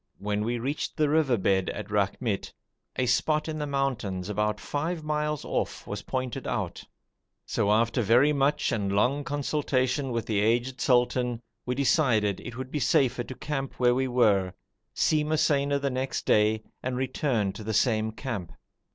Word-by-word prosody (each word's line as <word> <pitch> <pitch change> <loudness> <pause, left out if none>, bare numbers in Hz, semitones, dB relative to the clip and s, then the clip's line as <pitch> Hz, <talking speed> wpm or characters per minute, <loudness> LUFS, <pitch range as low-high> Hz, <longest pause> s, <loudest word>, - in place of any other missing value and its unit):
When 105 +1 -2
we 120 +2 -1
reached 135 +6 -3
the 150 -2 +2
river 145 -5 +3
bed 95 -1 +1
at 105 0 -6
Rakhmit, 100 +1 -1 0.4
a 130 - +1
spot 150 +5 +1
in 155 -1 -3
the 150 - -2
mountains 120 -10 -2
about 105 +1 0
five 160 +3 -3
miles 150 -1 -1
off - - -2
was 105 0 -5
pointed 130 0 -4
out; - - -3 0.6
so 100 - 0
after 115 +3 +2
very 125 +7 +4
much 140 +1 +1
and 100 -4 -1
long 125 +9 +2
consultation 140 -2 0
with 115 -1 -2
the 105 -3 0
aged 120 +4 +1
sultan, 125 -1 +2 0.3
we 125 - 0
decided 120 - +2
it 120 -1 -8
would 130 0 -6
be 150 - -1
safer 135 -4 +2
to 130 - -8
camp 135 -2 -4
where 125 -1 +4
we 130 +1 0
were, 105 -7 +2 0.4
see 155 -1 +2
Mosaina 145 -2 +2
next 130 +1 -2
day, 110 +1 +3 0.2
and 125 0 -2
return 130 -6 0
to 110 - -8
the 110 - -3
same 110 0 +2
camp. 110 -7 -5
125 Hz, 165 wpm, -27 LUFS, 110-140 Hz, 0.6 s, very